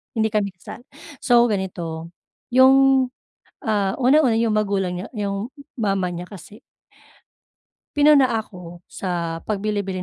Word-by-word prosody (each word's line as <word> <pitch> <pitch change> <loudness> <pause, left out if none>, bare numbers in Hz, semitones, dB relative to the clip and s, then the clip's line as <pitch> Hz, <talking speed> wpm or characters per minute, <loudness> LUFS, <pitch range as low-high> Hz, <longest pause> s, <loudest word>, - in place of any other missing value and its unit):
hindi 220 -1 0
kami 200 -3 -1
kasal. 180 - -11 0.4
So 240 -1 +4
ganito 170 -4 -4 0.4
yung, 265 +1 +5 0.6
ah, 205 -3 0
unang-una 260 -2 +3
yung 225 -1 +1
magulang 200 -4 0
niya 195 - -7
yung 200 +2 -3 0.3
mama 195 -5 0
niya 175 +1 -7
kasi 200 +2 -13 1.3
...pinuna 290 -2 +5 0.2
ako 175 -4 -12
sa 170 -3 -3
pagbili-bili 200 -3 -2
205 Hz, 115 wpm, -22 LUFS, 185-235 Hz, 1.3 s, yung